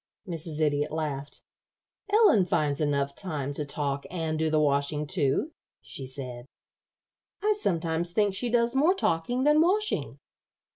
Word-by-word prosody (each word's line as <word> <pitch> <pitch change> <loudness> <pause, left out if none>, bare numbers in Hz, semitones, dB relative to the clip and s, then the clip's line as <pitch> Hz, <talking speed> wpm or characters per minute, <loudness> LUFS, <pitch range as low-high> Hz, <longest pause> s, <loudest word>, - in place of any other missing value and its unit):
Mrs. 165 -3 -4
Idiot 145 -1 +1
laughed. 150 -3 -4 0.7
"Ellen 405 - +5
finds 145 -4 0
time 150 - +1
enough 140 -1 0
to 145 -5 -3
talk 140 -1 -3
and 160 -3 -2
do 160 0 +1
the 155 0 +2
washing, 145 0 +1
too," 150 - 0 0.3
she 135 - -7
said. 125 -2 -6 1.0
"I 425 0 +4
sometimes 170 - -1
think 205 +1 +2
she 240 +5 -2
does 235 +1 +2
more 315 +8 +4
talking 245 - 0
than 300 +2 +5
washing." 415 +5 +1
160 Hz, 140 wpm, -27 LUFS, 145-225 Hz, 1.0 s, Ellen